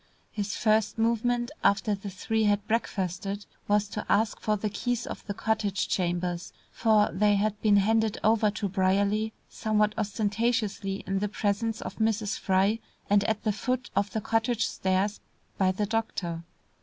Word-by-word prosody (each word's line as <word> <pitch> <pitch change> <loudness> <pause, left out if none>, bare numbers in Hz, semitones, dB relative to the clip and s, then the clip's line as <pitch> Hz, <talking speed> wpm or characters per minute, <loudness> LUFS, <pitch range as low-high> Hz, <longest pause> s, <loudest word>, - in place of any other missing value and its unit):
His 205 -2 -3
first 215 0 +2
movement 240 +2 +1
after 205 +1 +3
the 200 0 -5
three 220 +4 -1
had 205 0 +1
breakfasted, 200 -2 -2 0.2
was 205 0 +2
to 210 - -4
ask 215 0 +2
for 215 -1 0
the 210 - -2
keys 245 +2 -2
of - - -7
the 205 - -3
cottage 205 -3 0
chambers, 175 -1 -1 0.2
for 215 -3 +3
they 205 +3 +3
had 210 +1 0
been 210 -2 +5
handed 220 +1 +2
over 220 0 +4
to 210 0 -2
Brierly 200 +3 +1 0.2
somewhat 210 -1 +1
ostentatiously 210 -1 -1
in 195 0 -1
the 210 +1 -1
presence 215 +2 -1
of - - -6
Mrs. 220 -2 0
Fry 195 +4 +2 0.3
and 205 -1 +5
at 220 -1 -1
the 215 - +1
foot 250 +3 -2
of 200 0 +1
the 220 - -2
cottage 225 +1 +1
stairs, 190 +2 0 0.4
by 190 -1 +4
the 205 +3 -1
doctor. 200 -6 -2
210 Hz, 160 wpm, -28 LUFS, 200-220 Hz, 0.4 s, been